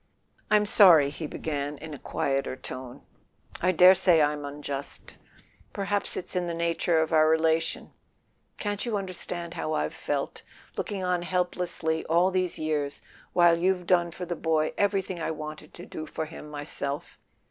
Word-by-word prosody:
"I'm 210 Hz, 0 st, +4 dB
sorry," 175 Hz, -10 st, +7 dB
he 155 Hz, +1 st, -5 dB
began 145 Hz, -1 st, -4 dB
in 155 Hz, -, -8 dB
a 140 Hz, -, -8 dB
quieter 135 Hz, -1 st, -1 dB
tone. 130 Hz, -1 st, -8 dB, 0.6 s
"I 185 Hz, -, +3 dB
dare 185 Hz, +1 st, +8 dB
say 180 Hz, -3 st, +4 dB
I'm 150 Hz, -1 st, +1 dB
unjust—perhaps 145 Hz, +7 st, -6 dB
it's 185 Hz, -, -6 dB
in 180 Hz, -1 st, 0 dB
the 170 Hz, -, -3 dB
nature 170 Hz, 0 st, +1 dB
of 160 Hz, +1 st, -1 dB
our 155 Hz, -1 st, +6 dB
rela¬ 160 Hz, 0 st, +3 dB
tion. 165 Hz, -, -5 dB, 0.7 s
Can't 205 Hz, -1 st, -2 dB
you 230 Hz, -4 st, -1 dB
understand 180 Hz, -3 st, -5 dB
how 155 Hz, -2 st, -3 dB
I've 75 Hz, +1 st, -1 dB
felt, -, -, -3 dB, 0.3 s
looking 195 Hz, -2 st, -3 dB
on 180 Hz, -1 st, 0 dB
helplessly 175 Hz, -2 st, -1 dB
all 175 Hz, +3 st, +3 dB
these 185 Hz, -1 st, -1 dB
years, 150 Hz, -2 st, -2 dB, 0.3 s
while 170 Hz, -1 st, +5 dB
you've 180 Hz, 0 st, +1 dB
done 175 Hz, -1 st, +3 dB
for 180 Hz, +2 st, -7 dB
the 175 Hz, 0 st, -3 dB
boy 160 Hz, -1 st, 0 dB
everything 195 Hz, -3 st, 0 dB
I 160 Hz, -, -1 dB
wanted 155 Hz, -1 st, -7 dB
to 175 Hz, -, -9 dB
do 155 Hz, -, -7 dB
for 160 Hz, -, -4 dB
him 155 Hz, -1 st, -10 dB
myself 145 Hz, -1 st, -5 dB
165 Hz, 160 wpm, -27 LUFS, 150-180 Hz, 0.7 s, dare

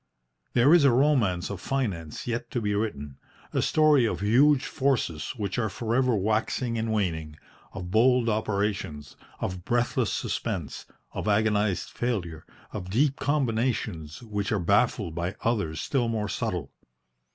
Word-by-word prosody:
There 125 Hz, +6 st, +5 dB
is 175 Hz, -4 st, +6 dB
a 140 Hz, -, +7 dB
romance 120 Hz, -10 st, +2 dB
of 95 Hz, -3 st, -6 dB
finance 95 Hz, -, -3 dB
yet 120 Hz, -1 st, -3 dB
to 125 Hz, -, -2 dB
be 105 Hz, -2 st, -1 dB
written, 75 Hz, -10 st, -3 dB, 0.3 s
a -, -, +1 dB
story 150 Hz, -6 st, +4 dB
of -, -, -3 dB
huge 130 Hz, +7 st, +4 dB
forces 130 Hz, -, -1 dB
which 105 Hz, +2 st, -2 dB
are 110 Hz, -2 st, 0 dB
for 115 Hz, +3 st, -3 dB
ever 125 Hz, -1 st, +3 dB
waxing 110 Hz, +4 st, 0 dB
and 115 Hz, 0 st, -1 dB
waning, 80 Hz, -8 st, -1 dB, 0.4 s
of 90 Hz, -2 st, -6 dB
bold 120 Hz, +3 st, +4 dB
operations, 100 Hz, -, -2 dB, 0.2 s
of 90 Hz, -1 st, -4 dB
breathless 120 Hz, +2 st, 0 dB
suspense, -, -, -3 dB, 0.3 s
of -, -, -4 dB
agonised 105 Hz, -2 st, +1 dB
failure, 90 Hz, -10 st, -3 dB, 0.2 s
of 90 Hz, -4 st, -6 dB
deep 135 Hz, +7 st, +2 dB
combinations 115 Hz, -, -1 dB
which 105 Hz, -3 st, -3 dB
are 110 Hz, -, +2 dB
baffled 100 Hz, 0 st, +1 dB
by 85 Hz, +4 st, -3 dB
others 100 Hz, -9 st, -1 dB
still 125 Hz, -4 st, 0 dB
more 110 Hz, -2 st, -1 dB
subtle. 90 Hz, -, -3 dB
110 Hz, 145 wpm, -27 LUFS, 95-120 Hz, 0.4 s, a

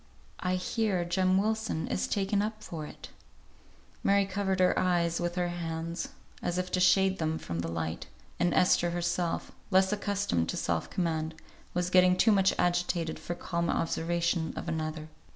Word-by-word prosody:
"I 180 Hz, 0 st, 0 dB
hear 185 Hz, -1 st, 0 dB
Jem 185 Hz, +2 st, +2 dB
Wilson 220 Hz, -4 st, 0 dB
is -, -, -1 dB
taken 200 Hz, 0 st, +1 dB
up 215 Hz, +1 st, -4 dB
for 155 Hz, -3 st, -6 dB
it." -, -, -11 dB, 0.9 s
Mary 200 Hz, 0 st, +4 dB
covered 195 Hz, 0 st, -1 dB
her 185 Hz, -, +5 dB
eyes 170 Hz, -2 st, +1 dB
with 175 Hz, 0 st, -1 dB
her 180 Hz, -1 st, 0 dB
hands, 170 Hz, 0 st, -4 dB, 0.3 s
as 175 Hz, 0 st, -1 dB
if 185 Hz, 0 st, -2 dB
to 185 Hz, -, +1 dB
shade 190 Hz, +1 st, +4 dB
them 160 Hz, 0 st, 0 dB
from 85 Hz, -, -5 dB
the 85 Hz, -, -2 dB
light, 80 Hz, -1 st, -3 dB, 0.3 s
and 175 Hz, -, +2 dB
Esther 175 Hz, -1 st, +4 dB
herself, 175 Hz, 0 st, -1 dB, 0.2 s
less 190 Hz, 0 st, +4 dB
accustomed 200 Hz, -, 0 dB
to -, -, -2 dB
self 85 Hz, -1 st, -1 dB
command, 160 Hz, -3 st, -1 dB, 0.4 s
was 180 Hz, 0 st, 0 dB
getting 185 Hz, 0 st, +5 dB
too 225 Hz, -, +5 dB
much 195 Hz, -2 st, +4 dB
agitated 175 Hz, -2 st, 0 dB
for 175 Hz, -, -4 dB
calm 170 Hz, -1 st, -2 dB
observation 170 Hz, 0 st, 0 dB
of -, -, -5 dB
another. 155 Hz, -1 st, -3 dB
175 Hz, 165 wpm, -30 LUFS, 165-190 Hz, 0.9 s, her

